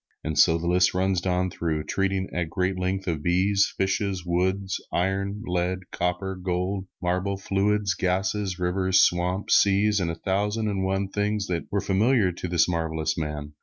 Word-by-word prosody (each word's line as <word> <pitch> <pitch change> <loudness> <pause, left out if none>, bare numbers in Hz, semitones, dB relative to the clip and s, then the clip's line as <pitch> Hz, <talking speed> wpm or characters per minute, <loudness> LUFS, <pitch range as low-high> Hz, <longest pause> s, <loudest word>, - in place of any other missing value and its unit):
And 80 -1 -3
so 80 +1 +5
the 85 - -5
list 90 +1 +3
runs 95 -1 +1
down 90 0 0
through, 80 -3 -2
treating 95 +1 -1
at 85 -2 -2
great 90 +2 -1
length 95 +1 -1
of 80 -4 -1
bees, 95 +4 +2
fishes, 95 -1 -1
woods, 95 +2 -1
iron, 100 +3 -1
lead, 90 +1 -1
copper, 90 +2 -2
gold, 90 +1 -2 0.2
marble, 90 +2 0
fluids, 100 0 0
gases, 95 +2 -1
rivers, 95 +1 +2
swamps, 90 +3 +2
seas, 100 +1 +4
and 85 -3 -1
a 85 - -3
thousand 105 +5 -1
and 95 -2 -1
one 95 +1 0
things 105 0 -1
that 85 -2 -2
were 100 -1 0
familiar 105 0 +2
to 90 +1 -6
this 85 -1 +3
marvelous 80 -2 -1
man. 75 -2 -4
95 Hz, 165 wpm, -25 LUFS, 90-100 Hz, 0.2 s, so